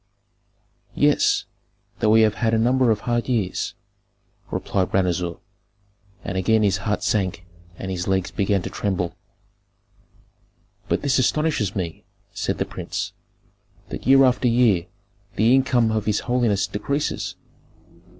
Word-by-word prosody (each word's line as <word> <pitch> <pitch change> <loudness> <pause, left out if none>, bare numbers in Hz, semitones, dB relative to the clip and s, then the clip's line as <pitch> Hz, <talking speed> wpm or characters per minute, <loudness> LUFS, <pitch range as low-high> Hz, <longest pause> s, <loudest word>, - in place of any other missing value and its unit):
"Yes, - - +3 0.5
though 110 - +2
we 110 +1 +6
have 110 -1 +4
had 115 -1 0
a - - +2
number 125 +2 +3
of 105 -2 +1
hard 120 +1 -1
years," 105 -7 -1 0.7
replied 95 -2 -1
Ranuzer; 90 -2 0 0.9
and 95 0 -3
again 110 +3 +3
his 95 -3 +2
heart 105 +2 -2
sank 95 -2 -1 0.3
and 95 - -5
his 90 -1 -3
legs 95 -1 0
began 100 -2 0
to - - -4
tremble. 90 -4 -2 1.8
"But - - 0
this 140 -2 +2
astonishes 130 - +1
me," 85 -5 -4 0.3
said - - -2
the - - -1
prince, - - -5 0.8
"that - - -6
year 135 +1 +7
after 125 0 +2
year 115 -7 +3 0.5
the 115 +4 +4
income 125 -4 +3
of 110 -2 -1
his 105 -1 +1
holiness 120 -5 +1
decreases. 140 +9 -3
105 Hz, 130 wpm, -23 LUFS, 95-120 Hz, 1.8 s, year